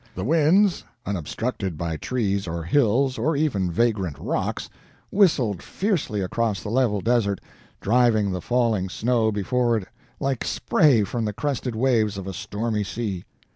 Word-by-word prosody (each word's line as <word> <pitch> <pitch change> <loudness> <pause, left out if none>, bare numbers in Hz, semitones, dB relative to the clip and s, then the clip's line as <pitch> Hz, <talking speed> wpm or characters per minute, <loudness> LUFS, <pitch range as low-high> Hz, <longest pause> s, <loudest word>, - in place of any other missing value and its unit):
The 95 - -3
winds, 165 - +3 0.2
unobstructed 95 - -3
by 85 0 -2
trees 100 - -1
or 85 0 -3
hills, 130 - +2
or 155 +7 +1
even 130 - 0
vagrant 95 -5 0
rocks, - - -2 0.4
whistled 135 - +3
fiercely 175 - -1
across 100 0 -1
the 105 - -4
level 115 -5 +2
desert, 110 -4 +1 0.4
driving 110 -2 +3
the 90 -1 -3
falling 115 -6 +1
snow 115 +2 +1
before 115 +4 +1
it 95 -4 -5 0.3
like 135 -3 -1
spray 135 -9 +3
from 115 +3 -2
the 105 - -2
crested 130 -1 -2
waves 110 -4 +2
of 95 - -5
a 95 - -5
stormy 105 +3 -2
sea. 100 -3 -4
110 Hz, 145 wpm, -24 LUFS, 100-125 Hz, 0.4 s, winds